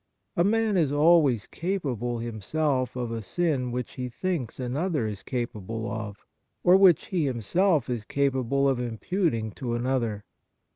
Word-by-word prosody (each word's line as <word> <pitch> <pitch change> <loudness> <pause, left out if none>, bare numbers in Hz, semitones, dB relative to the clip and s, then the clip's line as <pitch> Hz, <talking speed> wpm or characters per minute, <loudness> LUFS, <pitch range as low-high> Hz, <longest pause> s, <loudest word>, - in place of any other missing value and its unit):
A 170 - +3
man 220 0 +2
is 155 -6 +2
always 145 -6 +4
capable 135 - -2
himself 125 +4 -1
of 120 -2 -3
a 115 -1 -3
sin 135 - -1
which 125 0 -3
he 125 -2 -4
thinks 145 - -3
another 140 +2 -1
is 105 -3 -4
capaljle 115 -3 -4
of, 105 -2 -6 0.4
or 180 - +7
which 190 -5 +5
he 175 -6 +1
himself 140 - +1
is 120 -4 -3
capable 140 +1 +1
of 135 -2 +1
imputing 120 - -1
to 120 +1 -3
another. 120 -4 -1
130 Hz, 145 wpm, -27 LUFS, 115-160 Hz, 0.4 s, or